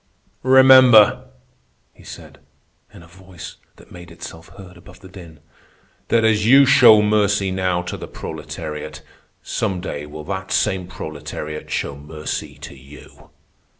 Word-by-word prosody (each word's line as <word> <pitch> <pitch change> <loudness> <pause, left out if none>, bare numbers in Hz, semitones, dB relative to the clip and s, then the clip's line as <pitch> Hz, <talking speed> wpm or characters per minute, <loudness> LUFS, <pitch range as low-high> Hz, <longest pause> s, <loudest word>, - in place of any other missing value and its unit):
"Remember," 130 -4 +6 0.7
he - - -20
said, - - -13 0.5
in 85 - -15
a - - -17
voice 90 -1 -13 0.2
that - - -20
made 85 -1 -13
itself 80 -1 -12
heard 95 -2 -13
above 90 - -17
the 95 - -13
din, 85 -5 -14 0.7
"that 115 -1 +1
as 105 -1 +1
you 135 +5 +6
show 115 -5 +6
mercy 100 -2 0
now 90 -1 -2
to 90 - -7
the - - -9
proletariat, 75 -1 -8 0.4
some 95 -5 -3
day 75 -5 -7
will 75 +1 -10
that - - -6
same 95 -2 -1
proletariat 75 -2 -8
show 70 - -4
mercy 75 +2 -7
to - - -10
you." 70 +2 -17
90 Hz, 140 wpm, -19 LUFS, 80-105 Hz, 0.7 s, Remember